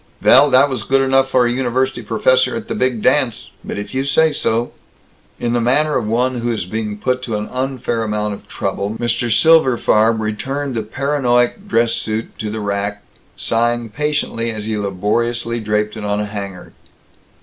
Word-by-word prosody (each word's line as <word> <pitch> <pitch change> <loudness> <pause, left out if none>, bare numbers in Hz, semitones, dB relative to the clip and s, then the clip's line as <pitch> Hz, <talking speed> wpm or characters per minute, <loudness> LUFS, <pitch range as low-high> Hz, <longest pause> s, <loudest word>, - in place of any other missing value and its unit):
"Vell, 140 +3 +6
that 135 +2 +5
was 130 -2 -3
good 135 0 +2
enough 135 0 +2
for 125 -2 +3
a 120 - +1
university 130 +1 -1
professor - - +2
at - - -5
the - - -3
big 130 - -1
dance, 125 -7 +1
but - - -5
if 105 +4 -6
you 130 +1 0
say 155 +3 +2
so 120 -3 -1 0.3
" - - -35
In 120 -1 -1
the 120 - +1
manner 150 +6 +2
of - - -1
one 125 +3 0
who 120 0 -1
is 110 -6 -2
being 105 +1 -4
put 125 +4 -1
to 115 -4 -3
an 105 0 -3
unfair 130 -3 -2
amount 105 -1 -2
of 100 - -11
trouble, 100 +2 -3
Mr. 120 0 -1
Silberfarb 115 -6 +4
returned 130 +6 -3
the 115 - -1
paranoiac 130 - 0
dress 115 - +2
suit 110 +1 -3
to 110 - -3
the 110 +1 -4
rack, 100 0 -2 0.3
sighing 120 0 0
patiently 150 -3 -2
as 110 -2 -5
he 110 0 -2
laboriously 115 +4 -1
draped 105 0 -1
it 110 - -7
on 105 0 -1
a 105 - -1
hanger. 100 -3 -7
120 Hz, 185 wpm, -18 LUFS, 105-130 Hz, 0.3 s, Vell